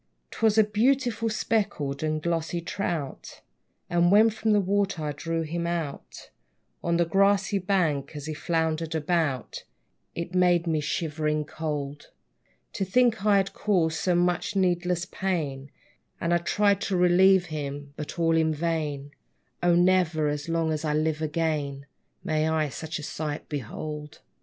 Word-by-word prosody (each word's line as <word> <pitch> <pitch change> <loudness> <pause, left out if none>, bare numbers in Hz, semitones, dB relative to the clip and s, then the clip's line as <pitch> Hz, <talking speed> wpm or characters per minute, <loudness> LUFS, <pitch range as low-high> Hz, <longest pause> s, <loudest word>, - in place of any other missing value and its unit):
'Twas 220 -1 +2
a 220 - +8
beautiful 230 +1 +1
speckled 195 -11 -1
and 155 0 -1
glossy 170 0 -1
trout; 165 -5 -4 0.5
And 175 0 +3
when 220 +2 +6
from 220 0 -1
the 210 - +5
water 200 -3 0
I 150 - -1
drew 165 +3 -3
him 170 +2 -3
out, 165 -5 -5 0.5
On 170 0 +1
the 170 - +3
grassy 195 +3 +2
bank 165 -7 0
as 145 -1 -6
he 155 - -4
floundered 160 +1 -1
about, 155 -5 -1 0.5
It 170 +1 -5
made 180 -2 +3
me 160 -2 +1
shivering 150 0 -1
cold, 145 -2 -5 0.6
To - - -2
think 225 +2 +2
I 205 -1 +6
had 195 0 0
caused 170 -7 +1
so 180 -2 +1
much 175 +3 +1
needless 180 -2 +1
pain; 150 -9 -3 0.5
And 170 +1 0
I 175 - +3
tried 200 +3 +2
to 190 - -1
relieve 180 +1 +5
him, 145 -1 -5
but 150 +2 -7
all 165 -1 +2
in 160 -1 +2
vain: 150 -3 -2 0.5
O 175 -1 +4
never, 175 -4 +3
as 145 +2 -4
long 165 -1 +1
as 155 0 -2
I 150 -1 0
live, 155 0 0
again 150 -3 -2 0.4
May 155 0 0
I 155 -2 +1
such 155 +4 -5
a 150 - -7
sight 150 0 -4
behold! 150 +2 -6
165 Hz, 150 wpm, -26 LUFS, 150-185 Hz, 0.6 s, a